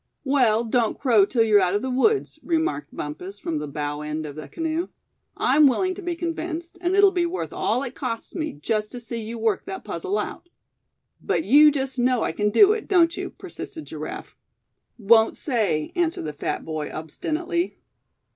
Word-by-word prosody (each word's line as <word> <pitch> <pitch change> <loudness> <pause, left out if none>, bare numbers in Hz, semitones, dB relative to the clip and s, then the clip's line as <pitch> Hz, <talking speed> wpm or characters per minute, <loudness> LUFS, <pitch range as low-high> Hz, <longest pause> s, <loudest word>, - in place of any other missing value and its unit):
"Well, 250 -6 +3
don't 230 -1 +1
crow 225 -7 +4
till 230 0 +2
you're 210 -2 +5
out 180 +1 +2
of 205 - -1
the 260 - -2
woods," 410 - +1
remarked 320 - -1
Bumpus, 180 +7 -6
from 165 -6 -3
the 150 - -5
bow 145 0 -4
end 150 +1 -4
of 145 -2 -7
the 155 - -8
canoe. 330 +1 -2 0.5
"I'm 300 -1 +5
willing 370 +8 +1
to 395 - -9
be 350 -2 -3
convinced; 335 0 -4
and 360 +1 +1
it'll 400 -1 +6
be 350 -2 +1
worth 360 +2 -4
all 255 - 0
it 260 -2 -5
costs 230 -3 -5
me 315 -2 -3
just 210 +7 -2
to 245 - -5
see 235 0 -5
you 225 +2 -6
work 220 -3 0
that 190 - -6
puzzle 185 +5 -3
out." 280 +10 -5 0.7
"But - - 0
you 300 +2 +7
just 270 -2 -2
know 250 -1 +2
I - - 0
c'n 210 0 0
do 405 - +6
it, 435 0 -2
don't 340 -3 +4
you?" - - -4
persisted 315 - -8
Giraffe. - - -7 0.6
"Won't 220 0 +4
say," 215 - 0
answered 335 - 0
the 150 - -4
fat 145 - -3
boy, 155 -2 -4
obstinately. 325 - -3
245 Hz, 190 wpm, -24 LUFS, 200-330 Hz, 0.7 s, you